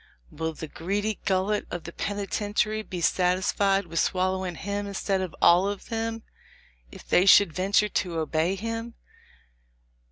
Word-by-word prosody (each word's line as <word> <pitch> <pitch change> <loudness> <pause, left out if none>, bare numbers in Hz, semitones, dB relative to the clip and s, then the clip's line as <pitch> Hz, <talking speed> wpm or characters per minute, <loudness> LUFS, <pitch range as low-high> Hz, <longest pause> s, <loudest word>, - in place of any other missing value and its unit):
"Will 160 +1 -3
the 160 - -7
greedy 200 +7 -2
gullet 195 +2 0
of 175 - -5
the 170 - -8
penitentiary 205 +1 -1
be 185 -5 -6
sat 180 +1 +2
isfied 195 +1 +1
with 165 0 -3
swallowing 185 -1 0
him 200 +3 -4
instead 195 -1 -1
of 185 -3 -5
all 180 +3 +6
of 205 -1 -7
them, 225 -1 -3 0.7
if - - -13
they 180 +2 +3
should 195 -4 +7
venture 195 +4 +2
to 175 -4 -2
obey 160 +3 0
him? 230 +3 -5
195 Hz, 150 wpm, -26 LUFS, 180-205 Hz, 0.7 s, should